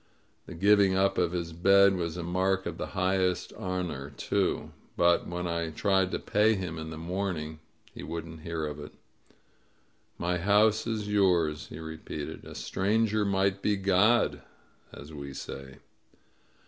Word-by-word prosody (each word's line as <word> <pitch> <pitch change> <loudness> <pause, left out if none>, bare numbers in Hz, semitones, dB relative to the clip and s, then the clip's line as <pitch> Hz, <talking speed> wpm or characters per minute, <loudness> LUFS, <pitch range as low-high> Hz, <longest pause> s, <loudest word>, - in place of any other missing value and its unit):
The - - -8
giving 100 +1 +4
up 95 0 +2
of 85 -2 +2
his 85 -2 -3
bed 100 +3 +5
was 85 -2 -3
a 90 - -4
mark 95 +2 0
of - - -5
the - - -3
highest 95 -1 +1
honor, 90 -7 -4
too. 70 - -1 0.3
But 85 0 +3
when 90 0 -4
I 85 -1 -1
tried 95 +3 +1
to - - -2
pay 110 +2 +2
him 90 -4 -4
in 80 0 -6
the 80 - -7
morning 85 -3 -3 0.3
he - - -9
wouldn't 85 -1 -6
hear 80 -1 -3
of 75 0 -5
it. 75 - -9 1.2
"My 90 +1 -1
house 105 +4 +3
is 110 -2 -2
youBS," 90 -7 +2
he - - -9
repeated. 80 0 -7
*A - - -9
stranger 105 - +1
might 95 0 +1
be 105 - +2
God,' 100 +4 +3 0.5
as 75 +2 -11
we 70 -2 -7
say." 65 0 -8
90 Hz, 155 wpm, -29 LUFS, 80-100 Hz, 1.2 s, bed